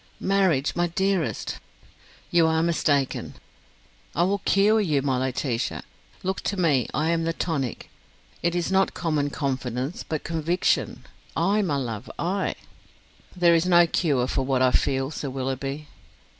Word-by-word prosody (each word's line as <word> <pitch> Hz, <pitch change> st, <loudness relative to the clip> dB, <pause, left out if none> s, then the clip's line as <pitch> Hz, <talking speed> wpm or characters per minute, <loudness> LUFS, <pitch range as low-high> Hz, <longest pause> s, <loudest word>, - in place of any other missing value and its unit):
"Marriage, 190 Hz, -8 st, +2 dB
my 175 Hz, 0 st, +1 dB
dearest.. 190 Hz, -1 st, -1 dB, 0.3 s
." -, -, -28 dB
"You 170 Hz, -2 st, +5 dB
are 160 Hz, 0 st, +2 dB
mistaken." 145 Hz, -5 st, 0 dB, 0.8 s
"I 170 Hz, -, +3 dB
will 200 Hz, +3 st, +1 dB
cure 210 Hz, +3 st, +3 dB
you, 150 Hz, -8 st, +1 dB
my 130 Hz, -3 st, +1 dB
Laetitia. 130 Hz, -2 st, -2 dB, 0.4 s
Look 190 Hz, +1 st, -2 dB
to 200 Hz, -, -2 dB
me, 145 Hz, -9 st, +2 dB
I 155 Hz, +4 st, 0 dB
am 165 Hz, -1 st, +1 dB
the 165 Hz, 0 st, 0 dB
tonic. 145 Hz, -9 st, -3 dB, 0.5 s
It 170 Hz, 0 st, 0 dB
is 175 Hz, +1 st, -1 dB
not 190 Hz, 0 st, +2 dB
common 155 Hz, -4 st, 0 dB
confidence, 130 Hz, 0 st, -3 dB
but 155 Hz, -2 st, -4 dB
conviction. 170 Hz, +2 st, 0 dB, 0.3 s
I, 195 Hz, +6 st, +2 dB
my 170 Hz, -8 st, 0 dB
love, 115 Hz, -4 st, -4 dB
I!" 190 Hz, +3 st, -1 dB, 0.8 s
"There 175 Hz, -2 st, +5 dB
is 165 Hz, +1 st, +2 dB
no 175 Hz, -1 st, +6 dB
cure 145 Hz, -7 st, +1 dB
for 135 Hz, -, -1 dB
what 130 Hz, -1 st, +1 dB
I 130 Hz, -, +4 dB
feel, 135 Hz, +2 st, +1 dB
Sir 145 Hz, -2 st, -4 dB
Willoughby." 135 Hz, +3 st, -4 dB
160 Hz, 150 wpm, -25 LUFS, 135-175 Hz, 0.8 s, no